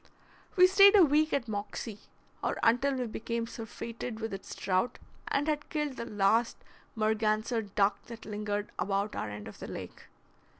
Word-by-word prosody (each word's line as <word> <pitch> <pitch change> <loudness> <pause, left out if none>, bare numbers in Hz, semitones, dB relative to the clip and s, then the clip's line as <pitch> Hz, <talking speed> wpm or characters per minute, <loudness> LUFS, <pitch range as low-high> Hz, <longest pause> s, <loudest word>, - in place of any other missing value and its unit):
We 365 - +8
stayed 395 +2 +7
a 380 - +8
week 305 +2 +3
at 260 -4 0
Moxie, 210 0 -5 0.4
or - - 0
until 250 +4 +3
we 255 -1 -1
became 230 +1 -3
surfeited 230 0 -6
with 225 -2 -4
its 195 - -7
trout, 190 +6 0 0.3
and 285 +2 0
had 295 -1 -1
killed 300 -3 -2
the 235 - -5
last 215 +3 +2 0.4
Merganser 220 +1 +1
duck 200 -1 +1
that 235 -1 -9
lingered 210 -1 -3
about 195 +3 -1
our 105 - -3
end 105 0 -7
of - - -11
the - - -7
lake. - - -8
225 Hz, 165 wpm, -30 LUFS, 205-260 Hz, 0.4 s, We